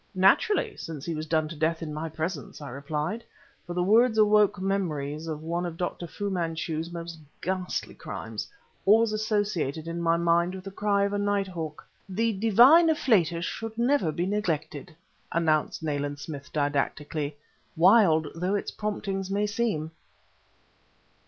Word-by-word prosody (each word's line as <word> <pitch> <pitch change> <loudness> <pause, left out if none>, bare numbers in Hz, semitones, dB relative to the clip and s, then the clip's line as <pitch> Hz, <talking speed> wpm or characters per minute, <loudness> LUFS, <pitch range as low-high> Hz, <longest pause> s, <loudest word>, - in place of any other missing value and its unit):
"Naturally; 405 - +3
since 155 -4 -7
he 170 - -2
was 155 0 -4
done 155 -1 +1
to 165 - -7
death 160 +2 0
in 155 -2 -5
my 160 +2 -4
presence," 160 +4 -4
I 145 -2 -7
replied; 150 - -3 0.4
for 175 - -5
the 180 - +1
words 220 +4 +4
awoke 210 -2 +4
memories 165 -6 -2
of 155 -1 -5
one 170 +2 -2
of 170 -2 -4
Dr. 175 0 -3
Fu 200 +4 -4
Manchu's 165 -2 -2
most 170 -1 -7 0.2
ghastly 185 0 -3
crimes, - - -6 0.3
always 220 +2 +5
associated 205 - -1
in 170 +1 -3
my 165 0 +3
mind 170 +2 +2
with 185 - -8
the 195 - -7
cry 200 0 +1
of 200 0 0
a 205 - 0
night 205 -1 +1
hawk. 160 -4 -6 0.2
"The 225 +4 0
divine 240 - +6
afflatus 175 - +2
should 225 +2 -5
never 240 - +2
be 170 +3 -1
neglected," 175 -5 -2 0.4
announced 160 -1 +1
Nayland 145 -1 -2
Smith 145 -1 -8
didactically, 145 0 -1 0.4
"wild 170 -4 +5
though 180 +4 -1
its 205 - -2
promptings 195 -2 -3
may 200 +1 +1
seem." 205 -8 -1
175 Hz, 155 wpm, -27 LUFS, 155-205 Hz, 0.4 s, divine